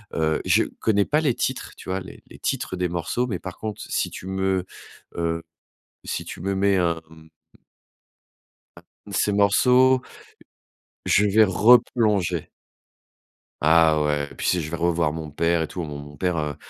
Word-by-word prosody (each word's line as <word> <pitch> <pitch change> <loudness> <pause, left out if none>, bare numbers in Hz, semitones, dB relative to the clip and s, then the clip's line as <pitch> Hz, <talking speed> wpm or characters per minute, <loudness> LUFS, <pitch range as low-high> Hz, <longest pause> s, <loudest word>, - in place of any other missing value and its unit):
heu, 80 -1 0
je - - +4 0.2
connais 100 -2 +2
pas 150 +1 +1
les 135 -6 +1
titres, - - -3
tu - - -10
vois 95 +1 -1
les 90 - -12
les - - -14
titres 95 - -2
des 90 -1 -1
morceaux. 90 +9 -2
Mais 95 -6 -2
par 95 -3 -8
contre, 110 -2 -5
si - - -1
tu - - -9
me, 95 -1 -1 0.5
heu, 85 -1 -1 0.6
si - - -4
tu - - -9
me 95 +2 -2
mets 100 0 +2
un, 85 -2 0
mmh 80 0 -16 1.5
un - - -14 0.3
de - - -8
ces 105 - +1
morceaux 125 +6 +4 1.0
je 105 - +4
vais 110 +2 +5
replonger. 105 -4 +3 1.2
Ah 80 -1 +5
ouais 75 -1 0
et - - -11
puis - - -4
si 90 - +2
je 80 0 -5
vais 85 - -3
revoir 85 -2 +1
mon 80 -2 -6
père 85 +3 +1
et 80 - -2
tout, 90 - -6
mon 75 - -6
mon 70 0 -10
mon 75 - -14
père, 90 +1 0
heu 75 -3 -2
90 Hz, 180 wpm, -23 LUFS, 80-100 Hz, 1.5 s, vais